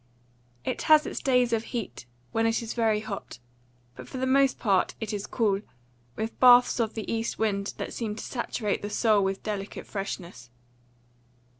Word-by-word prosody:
It - - -2
has 310 -1 +7
its - - -4
days 250 -3 +2
of 225 -1 +1
heat, 225 - -5 0.2
when 225 0 +2
it 225 +1 0
is 225 - -4
very 220 -3 +1
hot, 215 -2 -7 0.6
but - - -10
for - - -6
the 260 - 0
most 270 +1 +3
part 195 -5 +1
it 220 -1 -4
is 205 -1 -4
cool, 205 -4 +1 0.5
with 220 +1 -4
baths 245 0 +7
of 225 -2 0
the 220 0 -3
east 225 0 -2
wind 200 -2 -1
that - - -5
seem 220 -3 -3
to 220 - -7
saturate 225 -4 -2
the 205 - -4
soul 210 -1 +3
with 195 0 -2
delicious 205 -2 -5
freshness. 180 - -6
220 Hz, 175 wpm, -27 LUFS, 200-240 Hz, 0.6 s, has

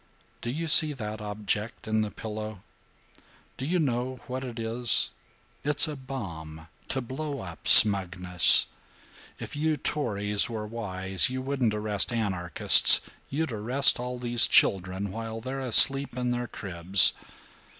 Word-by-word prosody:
"Do 120 - -7
you 160 +6 -6
see 155 0 +4
that 110 -4 -9
object 105 +2 -5
on 110 0 -2
the 105 - -4
pillow? 110 -2 -9 0.9
Do 130 - -8
you 180 +3 -2
know 130 -4 -4
what 130 +1 -7
it 125 -2 -10
is? 115 +1 0 0.5
It's 145 +2 +3
a 155 - -7
bomb 85 - -10 0.2
to 130 - -5
blow 140 +3 -8
up 85 -3 -11
smugness. 90 -4 +5 0.7
If - - -10
you 155 +1 -2
Tories 105 -8 -2
were 110 -2 -7
wise, 95 -4 -1
you 130 0 -7
wouldn't 130 -5 -3
arrest 105 0 -3
anarchists; 95 -7 +4 0.3
you'd 155 +1 -4
arrest 120 +6 +2
all 125 0 -7
these 120 -1 +3
children 95 +1 0
while 115 +1 -8
they're 130 +4 -8
asleep 135 +1 +4
in 125 -1 -3
their 120 0 -5
cribs. 90 -2 +2
115 Hz, 140 wpm, -25 LUFS, 100-130 Hz, 0.9 s, smugness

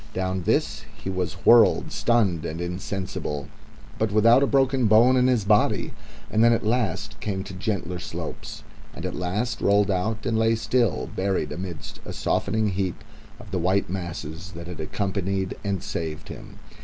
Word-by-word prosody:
Down 95 0 -1
this - - +1
he 95 - -5
was 90 -1 -2
whirled, 115 -2 +6
stunned 100 -9 +1
and 80 0 -4
insensible, 90 -4 -4 0.5
but - - +1
without 115 +5 +5
a 140 - +3
bone 135 -3 +3
broken 115 +4 +6
in 125 0 +4
his 120 -6 +2
body; 105 +1 +2 0.4
and 110 +1 +3
then 120 0 +6
at 115 - -1
last 115 -1 -1
came 95 -3 -3
to 95 -1 -9
gentler 95 -3 -3
slopes, - - -7 0.3
and 80 - -6
at 90 - -3
last 100 +7 -2
rolled 100 0 +3
out 105 +4 -1
and 115 -3 +1
lay 115 0 +3
still, 115 -1 0
buried 95 0 -1
amidst 90 -2 -6
a - - -7
softening 110 -1 0
heap 95 -2 -2 0.4
of 105 - -12
the 95 - -1
white 95 +1 +1
masses 85 -1 -5
that 85 +1 -8
had 90 -1 -8
accompanied 95 +2 -2
and 100 -3 -2
saved 80 -2 -4
him. - - -10
95 Hz, 165 wpm, -25 LUFS, 90-110 Hz, 0.5 s, whirled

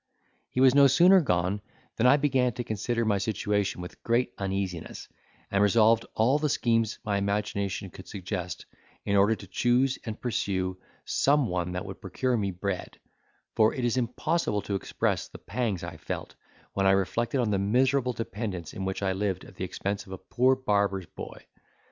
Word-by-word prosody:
He - - -3
was 130 -1 +7
no 140 0 +7
sooner 180 +7 +6
gone, 90 - 0 0.4
than 115 - +4
I 140 +3 +7
began 130 -4 +2
to 120 - -4
consider 115 +2 -1
my 105 -2 +2
situation 105 -3 -1
with 90 - -9
great 120 +1 +1
uneasiness, 95 -3 -3 0.4
and 100 - +2
revolved 110 +2 +4
all 125 +7 +3
the 150 0 0
schemes 115 -4 +1
my 100 -1 +1
imagination 100 -1 -2
could 95 - -12
suggest, 95 -2 -5 0.4
in 100 - +1
order 100 +3 +4
to 100 - -11
choose 125 +6 +1
and 110 -2 -6
pursue 95 -5 -2 0.3
some 145 0 +3
one 90 -2 -2
that 90 +2 -3
would 95 -1 -8
procure 125 +7 -1
me 100 -4 0
bread; 95 0 -4 0.6
for 110 -1 +4
it 125 - -1
is 120 - +1
impossible 125 -1 0
to 100 - -4
express 95 - -1
the - - -11
pangs 110 -8 -2
I - - -6
felt, - - -5 0.4
when 95 -1 +2
I 95 - +6
reflected 115 +7 0
on 115 -4 +1
the 100 - +1
miserable 125 +5 +2
dependence 105 -7 -5
in 95 - -4
which 95 +1 -3
I 95 - +1
lived 95 -1 -2
at - - -13
the 95 - -2
expense 100 +2 -4
of - - -12
a - - -5
poor 130 +7 +2
barber's 100 -6 0
boy. - - -10
105 Hz, 180 wpm, -28 LUFS, 95-125 Hz, 0.6 s, was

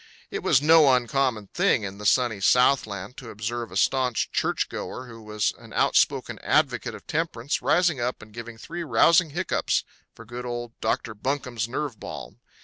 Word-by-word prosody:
It - - -3
was 140 - +3
no 155 -2 +7
uncommon 125 -4 0
thing 180 - +2
in 100 0 -6
the 105 - -1
Sunny 120 -4 +2
Southland 110 -2 +2
to 125 - -9
observe 115 +2 -4
a 95 - -4
staunch 125 +2 +1
churchgoer 130 - -2
who 115 -2 -11
was 105 -1 -1
an - - -14
outspoken - - +2
advocate - - +1
of - - -13
temperance 150 -5 -2
rising 175 -6 +2
up 125 +1 -2
and 110 0 -14
giving 115 0 -8
three 170 +9 -6
rousing 165 +6 +4
hiccups 175 +5 0 0.3
for 115 - -12
good 120 +2 -7
old 120 -1 -5
Dr. 115 - -1
Bunkum's 120 -1 -3
Nerve 130 -3 -4
Balm. - - -8
120 Hz, 165 wpm, -25 LUFS, 110-140 Hz, 0.3 s, no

